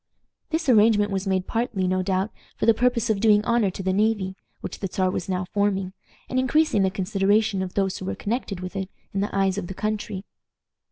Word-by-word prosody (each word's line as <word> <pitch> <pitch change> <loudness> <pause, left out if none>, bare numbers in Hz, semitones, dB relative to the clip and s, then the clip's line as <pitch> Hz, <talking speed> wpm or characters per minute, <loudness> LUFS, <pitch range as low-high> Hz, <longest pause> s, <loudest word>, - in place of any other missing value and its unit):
This 320 0 -1
arrangement 210 -3 +5
was 195 0 -2
made 190 -1 +1
partly, 225 -5 -1
no 185 0 +1
doubt, 190 +2 0 0.3
for - - 0
the 230 - +6
purpose 240 0 +1
of 205 - 0
doing 210 0 +4
honor 235 -4 +2
to 190 +1 -6
the 185 0 +1
navy, 205 -2 +1 0.3
which - - -6
the 195 - -2
Czar 185 -2 +1
was 180 - -4
now 185 0 -1
forming, 195 -2 0 0.3
and 255 - 0
increasing 260 -3 +2
the 190 - +3
consideration 195 +2 +1
of 185 -1 -5
those 195 -1 0
who 185 - -6
were - - -2
connected 205 -4 -3
with 185 +2 -6
it 190 -1 -3 0.2
in 195 - -1
the 205 - -1
eyes 195 0 +2
of 175 - -6
the 190 - -7
country. 210 -2 -3
200 Hz, 215 wpm, -24 LUFS, 190-220 Hz, 0.3 s, the